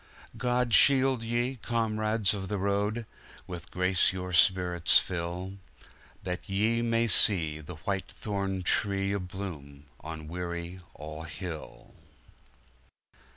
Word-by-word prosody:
God 125 -1 0
shield 135 +2 +5
ye, 120 +3 -1
comrades 110 -2 0
of 95 -2 -5
the 105 - -2
road 100 +4 -1 0.2
— - - -20
With 85 -1 -8
grace 90 0 +3
your 90 -1 -6
spirits 90 0 +4
fill, 90 +2 -3 0.6
That 90 +1 -5
ye 110 +4 +1
may 115 0 +1
see 85 -9 +5
the 85 +3 -9
White 95 +4 -4
thorn 100 -3 -3
tree 100 +1 0
A 100 - -1
bloom 85 -7 -8
on 80 -1 -8
Weary 85 +1 -5 0.2
All 75 +1 -8
Hill! 80 0 -8
95 Hz, 120 wpm, -28 LUFS, 85-110 Hz, 0.6 s, shield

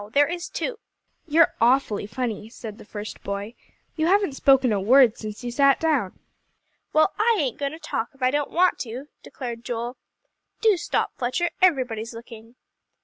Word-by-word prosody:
There 290 +1 +5
is 345 +3 -5
too." 450 +3 -4 0.5
"You're 320 +1 +4
awfully 235 -4 +2
funny," 220 -1 -4
said 220 -3 -9
the - - -12
first 210 0 -8
boy, 200 +3 -4 0.4
"you 315 0 0
haven't 390 -4 +3
spoken 270 -3 +4
a 200 - 0
word 245 +2 +6
since 215 +2 -8
you 240 - -3
sat 275 +2 +4
down." 290 -12 0 0.7
"Well, 310 +5 +3
I 455 +1 +3
ain't 265 -7 -1
going 280 0 -2
to - - -7
talk, 230 - -3
if 270 - -8
I 255 - +4
don't 290 0 -1
want 360 +1 +2
to," 255 +5 -6
declared 235 -3 -7
Joel. 240 +1 -4 0.6
"Do 440 -3 +4
stop, 345 - -1
Fletcher; 330 +8 0
everybody's 245 -10 +1
looking." 230 0 -12
255 Hz, 170 wpm, -24 LUFS, 225-310 Hz, 0.7 s, word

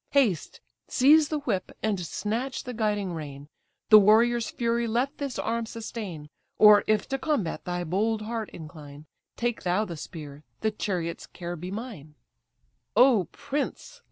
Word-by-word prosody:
Haste, 235 - +1 0.3
seize 295 +3 +5
the 305 -2 -2
whip, 190 -9 -2
and 210 -3 0
snatch 225 - -3
the 250 - -6
guiding 210 -4 -1
rein; 145 -2 -7 0.4
The 215 -1 +10
warrior's 225 +3 +4
fury 235 0 0
let 250 +7 -1
this 280 -3 -3
arm 230 0 -1
sustain; 205 -10 -7 0.3
Or, 210 -1 +8
if 215 -1 +2
to 270 -1 -1
combat 270 - -1
thy 175 0 -2
bold 215 +6 0
heart 225 -1 -4
incline, 150 -2 -11 0.3
Take 240 -1 -1
thou 185 +4 +1
the 170 -4 -6
spear, 150 -2 -9 0.2
the 220 - +1
chariot's 180 -5 -3
care 175 0 -6
be 175 +2 -7
mine." 195 - -7 0.8
"O 240 -5 +6
prince! 295 - -4
215 Hz, 150 wpm, -27 LUFS, 175-235 Hz, 0.8 s, The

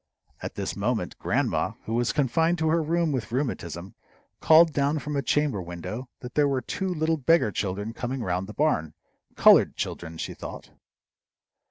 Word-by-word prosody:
At - - -6
this - - -3
moment, 105 -3 -1
grandma, - - 0
who 110 - -4
was 120 +1 +1
confined 160 +5 +1
to 160 -1 +1
her 165 +1 +3
room 165 +1 +1
with 125 -6 -3
rheumatism, 95 - -3 0.5
called 160 0 +6
down 140 +2 +1
from 150 0 -4
a 140 - +1
chamber 140 -5 +1
window 90 +9 -6
that 125 - -8
there 150 -1 +3
were 135 -2 0
two 190 +6 -3
little 160 -1 0
beggar 155 -5 +3
children 100 +3 -3
coming 125 +1 -4
round 90 0 -2
the 105 - -8
barn 80 - 0 0.4
colored - - +6
children, 80 -1 -5
she - - -4
thought. - - -9
130 Hz, 170 wpm, -26 LUFS, 105-155 Hz, 0.5 s, called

